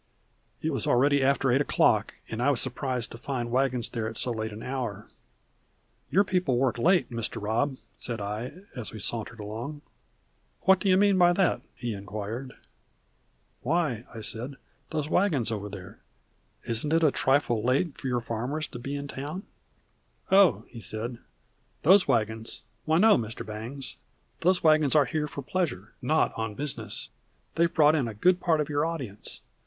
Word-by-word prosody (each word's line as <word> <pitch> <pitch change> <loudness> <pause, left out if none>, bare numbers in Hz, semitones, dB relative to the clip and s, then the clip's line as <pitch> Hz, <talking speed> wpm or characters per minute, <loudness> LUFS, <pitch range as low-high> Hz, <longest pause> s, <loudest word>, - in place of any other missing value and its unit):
It - - 0
was - - -1
already 140 +3 +4
after 135 -1 +3
eight 135 +3 +4
o'clock, - - +2
and 110 +1 -4
I 130 - +3
was 140 -4 +2
surprised 125 -2 -1
to 115 - -9
find 120 -2 -3
the - - -8
wagons 125 -2 +1
there 115 -2 -2
at 110 - -8
so 125 - 0
late 110 -1 -3
an 105 +2 -8
hour. 120 -6 -4 1.0
"Your 200 - +4
people 180 -10 +1
work 125 -2 +1
late, 175 +1 +3
Mr. 115 -2 -2
Robb," 120 +7 0 0.2
said 115 -2 -4
I, 110 - -5
as 125 -4 -5
we 110 - -8
sauntered 115 +2 -3
along. 115 +8 -6 0.8
"What 190 +1 +5
do 200 - 0
you 185 - +6
mean 200 -1 +4
by 175 0 +6
that?" 190 0 +2
he 120 -2 -3
inquired. 105 +5 -5 1.1
"Why," 140 -5 0 0.2
said 115 +5 -3
I, - - -24 0.3
"those 155 -2 -2
wagons 155 - +2
over 105 -2 -3
there. 100 +2 -10 0.7
Isn't 120 +7 0
it 165 0 +3
a 150 - +5
trifle 135 -5 +2
late 135 +6 +1
for - - -6
your 125 -1 0
farmers 125 +7 -2
to 120 - -8
be 135 +4 -4
in 140 0 -4
town?" 145 +8 -5 0.9
"Oh," 180 - +5
he 115 - -10
said, 115 +3 -4 0.6
"those 190 +4 +6
wagons 110 -3 -1 0.2
why 160 +1 +3
no, 215 - +6
Mr. 115 +1 -5
Bangs. 115 +6 -6 0.4
Those 180 +1 +3
wagons 155 -2 +4
are 145 -2 +6
here 150 +3 -1
for 140 -1 -7
pleasure, 140 - -2
not 155 +5 +2
on 110 -2 -3
business. 145 +3 -2 0.4
They 170 - +3
have 170 - -3
brought 150 -1 +6
in 145 -6 +1
a 110 - -6
good 180 - +3
part 165 -4 +2
of 150 - 0
your 145 -1 0
audience. 135 -11 -4
130 Hz, 175 wpm, -28 LUFS, 115-155 Hz, 1.1 s, you